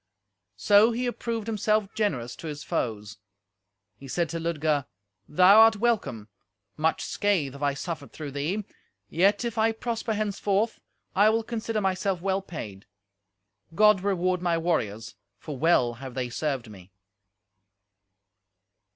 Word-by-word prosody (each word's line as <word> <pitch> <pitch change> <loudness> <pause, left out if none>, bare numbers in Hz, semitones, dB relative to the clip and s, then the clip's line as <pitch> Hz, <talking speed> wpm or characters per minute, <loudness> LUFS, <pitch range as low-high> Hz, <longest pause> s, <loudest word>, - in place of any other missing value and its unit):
So 210 +3 +5
he 245 +2 -2
approved 230 -2 -3
himself 215 -1 +1
generous 130 - -2
to 165 - -8
his 150 -1 -6
foes. 105 -3 -3 0.8
He 135 - -11
said 170 +4 -1
to 165 +1 -4
Ludger, 155 -4 -1 0.4
"Thou 185 +6 +7
are 225 0 +8
welcome! 205 - -1 0.5
Much 160 +1 0
scathe 180 -10 0
have 140 - -11
I 140 -1 +1
suffered 155 -1 -6
through 150 -3 -7
thee; 165 +9 -2 0.4
yet, 200 +7 +2
if 230 -1 -3
I 225 +1 +3
prosper 225 -1 -3
henceforth, 210 +1 -1 0.4
I 205 +3 +5
will 225 +1 +1
consider 225 -1 -3
myself 190 -1 0
well 195 +2 -1
paid. 105 - -8 0.9
God 210 0 +5
reward 185 -2 0
my 170 -2 +1
warriors, 115 - -2 0.2
for 150 +7 -7
well 130 -5 +3
have 130 +1 -9
they 125 -2 -2
served 135 -3 -2
me!" 95 -3 -14
180 Hz, 135 wpm, -26 LUFS, 140-210 Hz, 0.9 s, are